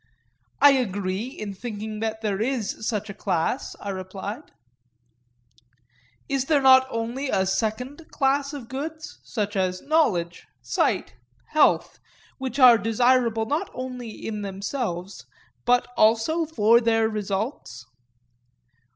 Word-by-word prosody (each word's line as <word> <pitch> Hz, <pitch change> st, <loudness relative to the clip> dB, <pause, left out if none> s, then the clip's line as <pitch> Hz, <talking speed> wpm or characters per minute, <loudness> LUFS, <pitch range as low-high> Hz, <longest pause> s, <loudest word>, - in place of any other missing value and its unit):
I 285 Hz, -, +8 dB
agree 205 Hz, -4 st, -1 dB
in 215 Hz, -6 st, -7 dB
thinking 215 Hz, 0 st, -6 dB
that 220 Hz, 0 st, -3 dB
there 205 Hz, -2 st, -1 dB
is 225 Hz, -3 st, -2 dB
such 210 Hz, -3 st, -2 dB
a -, -, -8 dB
class, 185 Hz, +5 st, -2 dB
I 200 Hz, -, -6 dB
replied. 195 Hz, +7 st, -7 dB, 1.8 s
Is 275 Hz, -2 st, -1 dB
there 295 Hz, 0 st, +3 dB
not 260 Hz, 0 st, +7 dB
also 230 Hz, +3 st, -3 dB
a 190 Hz, -, +2 dB
second 245 Hz, -, -2 dB
class 275 Hz, 0 st, +1 dB
of 280 Hz, -6 st, -8 dB
goods, 310 Hz, +5 st, -6 dB
such 210 Hz, -2 st, -3 dB
as 185 Hz, -1 st, -1 dB
knowledge, 180 Hz, -, +1 dB
sight, -, -, 0 dB, 0.4 s
health, 305 Hz, -1 st, +2 dB, 0.4 s
which 260 Hz, -1 st, -4 dB
are 250 Hz, -4 st, +8 dB
desirable 225 Hz, +1 st, +2 dB
not 310 Hz, -, -2 dB
only 250 Hz, -2 st, -6 dB
in 215 Hz, -1 st, -6 dB
themselves, 195 Hz, -1 st, -4 dB, 0.4 s
but 245 Hz, 0 st, +3 dB
also 230 Hz, +10 st, +3 dB
for 235 Hz, -5 st, +4 dB
their 225 Hz, -1 st, +2 dB
results? 200 Hz, -, -4 dB
225 Hz, 120 wpm, -24 LUFS, 205-265 Hz, 1.8 s, I